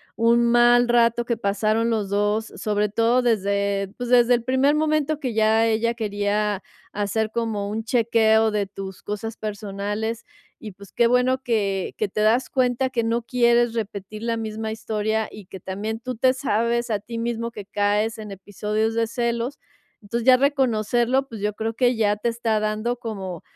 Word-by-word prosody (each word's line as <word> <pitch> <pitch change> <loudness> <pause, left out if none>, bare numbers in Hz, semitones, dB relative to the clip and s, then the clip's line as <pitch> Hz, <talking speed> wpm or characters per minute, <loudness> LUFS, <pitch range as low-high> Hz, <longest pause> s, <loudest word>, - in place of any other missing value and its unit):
un 235 +1 +3
mal 240 0 +5
rato 235 0 +3
que 235 -1 -2
pasaron 215 +3 0
los 210 -3 -1
2, 205 +2 0
sobre 210 -1 0
todo 230 +4 +2
desde 200 -3 0
pues 245 -1 -4
desde 245 0 +5
el 240 -1 +1
primer 260 +3 +2
momento 310 -1 0
que 255 -6 -3
ya 220 +1 +3
ella 230 +1 +1
quería 205 -2 -1 0.3
hacer 210 +2 -1
como 215 -3 -2
un 220 +1 -3
chequeo 225 -2 +3
de 205 -1 0
tus 195 -1 -9
cosas 210 +2 -5
personales 210 +2 -4 0.4
y, 210 -3 -8
pues, 200 0 -15
qué 235 - +3
bueno 250 +2 +2
que 200 -6 -1
que 210 -2 -1
te 210 - -4
das 225 +4 +2
cuenta 255 0 +1
que 235 -3 -1
no 230 +1 0
quieres 240 -1 +2
repetir 215 -1 -5
la 230 0 0
misma 220 0 -4
historia 220 0 -2
y 210 -3 -11
que 185 0 -11
también 215 +4 -4
tú 255 0 -5
te 255 +1 +3
sabes 235 -2 0
a 210 -2 0
ti 230 +3 -8
mismo 230 0 -3
que 210 -3 -8
caes 210 +3 0
en 210 -2 -8
episodios 210 +3 -2
de 230 0 0
celos, 235 +2 -2 0.4
entonces 230 +3 -4
ya 255 - +9
reconocerlo, 255 -1 +1
pues 225 -3 -8
yo 210 0 -1
creo 225 +1 -3
que 245 0 +2
ya 210 -2 +2
te 225 - -2
está 230 -2 0
dando 215 +3 -1
como 195 -7 -6
225 Hz, 180 wpm, -23 LUFS, 210-235 Hz, 0.4 s, ya